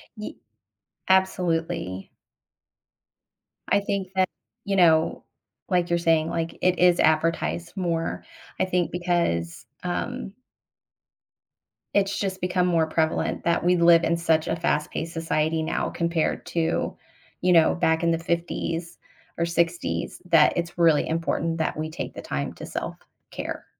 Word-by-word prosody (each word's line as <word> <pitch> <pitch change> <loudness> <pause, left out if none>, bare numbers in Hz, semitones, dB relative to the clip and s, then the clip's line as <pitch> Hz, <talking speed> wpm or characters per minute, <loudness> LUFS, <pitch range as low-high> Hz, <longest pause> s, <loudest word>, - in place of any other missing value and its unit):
Ye 210 - -7 0.7
Absolutely. 170 - 0 1.6
I 200 - +4
think 200 -2 -2
that, 185 0 +3 0.4
you 200 - 0
know, 165 -3 +4 0.5
like, 180 -2 +1
you're 170 - +2
saying, 165 -1 +2
like, 165 0 -3
it 180 -1 +2
is 180 -1 +5
advertised 165 +2 +1
more, 170 -3 -2 0.4
I - - +3
think 180 -3 0
because, 170 - -1 0.2
um 195 +4 -3 1.6
it's 200 0 +1
just 190 -2 -3
become 180 0 +1
more 165 -3 +2
prevalent 160 0 0
that 170 0 +1
we 180 +1 +4
live 170 -1 +6
in 170 +1 +1
such 160 -2 +1
a - - 0
fast-paced 165 0 -2
society 160 -1 0
now 160 - -1
compared 170 -1 -1
to, 165 -1 -1 0.4
you 180 0 +3
know, 165 -2 +5
back 160 -2 +2
in 170 - +2
the 165 - +1
'50s 170 0 -3 0.4
or 170 - +1
'60s 170 0 -1
that 165 -3 +5
it's 170 0 -3
really 165 -3 +4
important 165 0 -1
that 160 - -1
we 155 +1 -3
take - - -5
the - - -6
time 70 0 -3
to - - -9
self-care. - - -7
170 Hz, 135 wpm, -25 LUFS, 160-180 Hz, 1.6 s, live